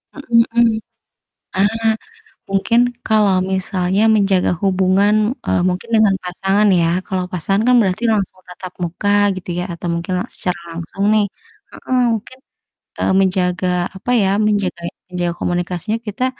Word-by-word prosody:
Mhm 290 - -9
mhm. 230 -1 +4
Ah, 235 - +5 1.9
mungkin 200 +4 +2 0.3
kalau 210 -3 +3 0.2
misalnya 190 +1 0
menjaga 195 -3 +2
hubungan, 190 +2 +3 0.3
eee, - - +1
mungkin 185 +6 -4
dengan 210 -3 +4
pasangan 195 +3 +1
ya. 165 - +2 0.2
Kalau 185 -2 -2
pasangan 195 +3 0
kan 250 - +5
berarti 195 +3 -1
langsung 195 -2 -2
tatap 180 0 -9
muka 175 +4 -2 0.3
gitu 185 -1 -8
ya - - -1
atau 170 +1 -6
mungkin 170 +2 -3
la - - -3
secara 180 -1 -3 0.2
langsung 195 +4 -5
nih. 210 -1 +3 0.4
Heeh, 255 -1 -2
mungkin, 225 +4 -6 0.6
eee, - - +1
menjaga 185 -2 0 0.3
apa 225 +6 -5
ya, 190 - +2 0.2
menjaga 200 -5 -1 0.3
menjaga 175 -1 -2
komunikasinya 175 +5 -2
kita 210 +5 -2
190 Hz, 140 wpm, -18 LUFS, 180-210 Hz, 1.9 s, Ah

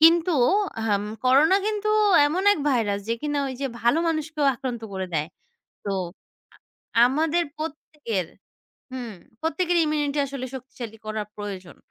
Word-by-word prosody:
কিন্তু 335 +2 +6 0.5
আহম 205 -2 +1 0.2
করোনা 290 +9 +6
কিন্তু 425 0 -1 0.4
এমন 345 +6 0
এক 375 - -2
ভাইরাস 220 -6 +1
যে 230 - +2
কিনা 295 -1 -1
ওইযে 265 +1 -3
ভালো 240 +7 +3
মানুষকেও 310 -2 -1
আক্রান্ত 245 -2 -5
করে 190 -1 -3
দেয়। 155 -1 +1 0.6
তো - - -3 1.1
আ - - +7
আমাদের 320 +5 +1
প্রত্যেকের, 295 - -4 0.7
হুম, 245 -3 -5 0.3
প্রত্যেকের 335 +3 0
ইমিউনিটি 295 -1 0
আসলে 275 -2 -5
শক্তিশালী 240 -3 -8
করা 215 0 -2
প্রয়োজন। 195 -4 -7
275 Hz, 130 wpm, -25 LUFS, 225-315 Hz, 1.1 s, আ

